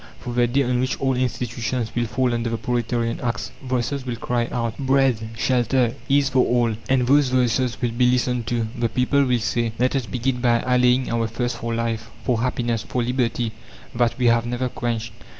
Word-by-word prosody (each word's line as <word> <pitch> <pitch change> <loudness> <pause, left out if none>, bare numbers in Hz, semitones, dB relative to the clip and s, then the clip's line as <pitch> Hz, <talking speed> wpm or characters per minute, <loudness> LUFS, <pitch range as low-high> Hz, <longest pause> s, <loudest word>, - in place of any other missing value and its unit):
For 120 - -6
the 120 0 +3
day 135 +4 +2
on 125 -1 0
which 130 +1 -1
old 135 -2 +1
institutions 120 -2 -2
will 120 0 0
fall 125 +1 0
under 115 0 -1
the 115 - -2
proletarian 120 -1 -1
axe, 120 -1 -3
voices 130 +1 -2
will 125 -2 -3
cry 120 0 -1
out: 115 -2 -2
"Bread, 130 -5 +2
shelter, 120 0 +2 0.2
ease 140 0 +4
for 130 -1 +3
all!" 120 -2 +1
And 130 -2 +3
those 140 +1 +4
voices 125 -1 +1
will 120 -2 0
be 125 +1 +3
listened 125 -2 0
to; 120 -2 0
the 120 -2 0
people 135 +4 +2
will 125 -2 +2
say: 115 0 -1
"Let 125 +3 +1
us 130 -4 -1
begin 125 +4 -1
by 120 -2 +3
allaying 125 0 +2
our 115 -1 0
thirst 120 +1 -3
for 115 0 -3
life, 115 -1 -2
for 120 -3 0
happiness, 120 -2 -1
for 125 - -2
liberty, 120 -2 0 0.4
that 120 -1 +1
we 125 - 0
have 115 0 +3
never 125 +1 -1
quenched. 115 -2 -3
120 Hz, 200 wpm, -22 LUFS, 115-125 Hz, 0.4 s, ease